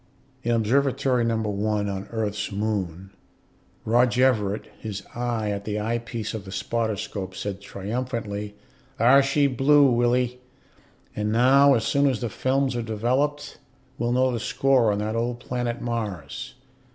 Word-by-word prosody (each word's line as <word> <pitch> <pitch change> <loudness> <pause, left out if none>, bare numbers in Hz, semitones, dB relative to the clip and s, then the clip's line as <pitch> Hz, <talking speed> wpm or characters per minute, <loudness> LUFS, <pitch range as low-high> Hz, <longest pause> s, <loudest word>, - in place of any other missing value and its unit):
In 120 - 0
Observatory 130 +2 +2
No. 115 -1 +1
1 105 0 -1
on 100 0 -4
Earth's 105 -3 -2
moon, 95 -3 -3 0.7
Rog 120 +2 +3
Everett, 110 -6 +1
his 105 -3 -6
eye 120 -3 -2
at 100 0 -4
the 105 0 -3
eyepiece 115 0 -3
of 110 -3 -5
the 95 - -10
spotter 110 +3 -1
scope, 95 -2 -5
said 100 0 -5
triumphantly, 105 0 -4 0.4
"Thar 125 +5 +6
she 140 +1 +2
blew, 140 +1 +4
Willie. 120 +1 +1 0.8
And 105 0 -1
now, 135 +4 +5
as 115 - 0
soon 140 +4 +2
as 130 -5 0
the 120 - -3
films 130 +4 0
are 120 - -1
developed, 125 +7 -1 0.4
we'll 120 +1 0
know 130 +1 +3
the 120 - -2
score 125 0 +2
on 100 - -1
that 105 +2 -2
old 120 +1 -1
planet 120 0 -3
Mars." 105 - -4
115 Hz, 150 wpm, -25 LUFS, 105-125 Hz, 0.8 s, Thar